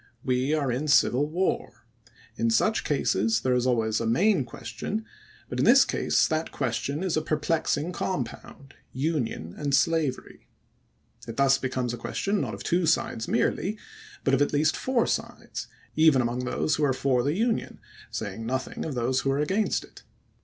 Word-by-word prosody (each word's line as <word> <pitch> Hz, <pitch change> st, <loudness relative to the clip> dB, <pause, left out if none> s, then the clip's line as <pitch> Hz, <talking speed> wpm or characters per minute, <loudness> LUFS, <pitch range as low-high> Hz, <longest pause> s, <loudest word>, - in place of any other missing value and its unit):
We 130 Hz, +3 st, +1 dB
are 140 Hz, -4 st, 0 dB
in 135 Hz, +6 st, -2 dB
civil 145 Hz, +1 st, +3 dB
war. 180 Hz, -4 st, -2 dB, 0.5 s
In 115 Hz, 0 st, +1 dB
such 215 Hz, -, +2 dB
cases 110 Hz, -6 st, +1 dB
there 130 Hz, +1 st, +1 dB
always 120 Hz, -3 st, +1 dB
is -, -, -1 dB
a 115 Hz, -, -1 dB
main 175 Hz, -, +3 dB
question; 120 Hz, -, -5 dB, 0.4 s
but -, -, -5 dB
in -, -, +3 dB
this -, -, +7 dB
case -, -, +2 dB
that 160 Hz, +1 st, -2 dB
question 140 Hz, +5 st, -2 dB
is 185 Hz, -4 st, 0 dB
a 155 Hz, -, +1 dB
perplexing 155 Hz, +1 st, 0 dB
compound 140 Hz, -4 st, -5 dB
— -, -, -40 dB, 0.2 s
Union 115 Hz, -, -3 dB
and 145 Hz, -2 st, 0 dB
Slavery. 155 Hz, -4 st, 0 dB, 0.8 s
It 115 Hz, -, -7 dB
thus 135 Hz, 0 st, +4 dB
becomes 130 Hz, -2 st, -2 dB
a -, -, -4 dB
question 200 Hz, -, -1 dB
not -, -, -3 dB
of -, -, -9 dB
two 175 Hz, -1 st, +1 dB
sides 115 Hz, -7 st, 0 dB
merely, 210 Hz, +3 st, 0 dB, 0.5 s
but -, -, +1 dB
of 135 Hz, -, +3 dB
at 145 Hz, -, +2 dB
least 155 Hz, +2 st, +2 dB
four 255 Hz, -3 st, +1 dB
sides, -, -, -4 dB, 0.3 s
even 155 Hz, -4 st, +5 dB
among 125 Hz, +1 st, -1 dB
those 145 Hz, +4 st, 0 dB
who 150 Hz, -, 0 dB
are 140 Hz, -2 st, +3 dB
for 130 Hz, -1 st, +1 dB
the 140 Hz, +4 st, 0 dB
Union, 225 Hz, +3 st, -1 dB, 0.3 s
saying 115 Hz, -, -5 dB
nothing 130 Hz, +3 st, -3 dB
of 150 Hz, -, -4 dB
those 125 Hz, +2 st, +1 dB
who 135 Hz, -, -1 dB
are 135 Hz, -, +1 dB
against 190 Hz, +9 st, 0 dB
it. -, -, -15 dB
140 Hz, 175 wpm, -26 LUFS, 125-160 Hz, 0.8 s, this